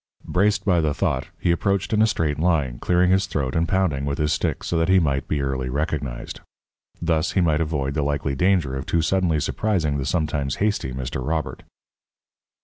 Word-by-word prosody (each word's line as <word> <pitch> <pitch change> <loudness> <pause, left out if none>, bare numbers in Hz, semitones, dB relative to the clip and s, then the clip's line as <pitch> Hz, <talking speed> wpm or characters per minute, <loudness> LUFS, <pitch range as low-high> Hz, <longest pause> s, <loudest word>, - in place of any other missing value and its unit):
Braced 100 +3 +1
by 90 -4 +3
the 75 -2 0
thought, 65 - -1
he 85 - +1
approached 100 +4 0
in 105 - +3
a 110 - +5
straight 75 -8 -1
line, 75 -8 +1
clearing 90 +1 +2
his 95 +1 +2
throat 70 -7 -2
and 85 +1 +1
pounding 90 -7 +1
with 70 0 -2
his 75 0 +1
stick - - -2
so - - -2
that 80 +2 +1
he 95 - +6
might 70 -5 0
be 75 -2 -1
early 65 -1 -2
recognized. 70 -3 -3 0.6
Thus 80 -2 0
he - - +2
might 80 -2 +2
avoid 75 -4 -1
the 75 - 0
likely 70 -1 -1
danger 85 -3 +1
of 65 - -5
too 85 -1 +1
suddenly 85 -2 +1
surprising 80 -3 0
the 65 - -2
sometimes 75 -5 -1
hasty 105 -10 -1
Mr. 65 0 -4
Robert. 80 +2 -2
80 Hz, 195 wpm, -23 LUFS, 70-90 Hz, 0.6 s, he